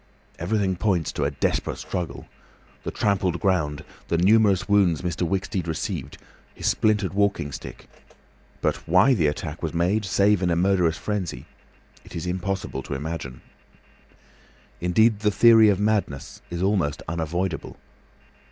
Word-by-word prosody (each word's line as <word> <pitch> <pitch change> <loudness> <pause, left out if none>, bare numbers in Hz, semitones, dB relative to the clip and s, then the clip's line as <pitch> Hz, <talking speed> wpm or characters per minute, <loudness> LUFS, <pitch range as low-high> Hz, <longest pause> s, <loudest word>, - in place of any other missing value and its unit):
Everything 95 +1 0
points 85 -7 0
to 70 - -2
a - - +2
desperate 70 -1 -1
struggle—the 90 -3 -8
trampled 95 -4 0
ground, 80 -7 0 0.2
the 85 - 0
numerous 100 0 +4
wounds 95 -6 +3
Mr. 85 -1 -3
Wicksteed 95 -1 -2
received, 80 - -4 0.4
his - - -7
splintered 105 -3 +1
walking 100 -7 0
stick; - - -9 0.7
but - - +1
why 95 +11 +5
the 85 -10 +2
attack 75 +2 -4
was 80 -1 -3
made, 90 +6 +1
save 100 +1 +2
in 90 - +1
a 85 - +2
murderous 90 -2 +2
frenzy, 95 - -4 0.6
it - - -12
is 85 - -4
impossible 90 -5 -3
to 70 - -5
imagine. 70 -3 -5 1.4
Indeed 105 +5 +3
the 105 0 +2
theory 110 0 +6
of 100 -2 +2
madness 105 -10 -1
is 85 +1 -3
almost 95 -8 0
unavoidable. 85 +1 -3
90 Hz, 135 wpm, -24 LUFS, 80-100 Hz, 1.4 s, theory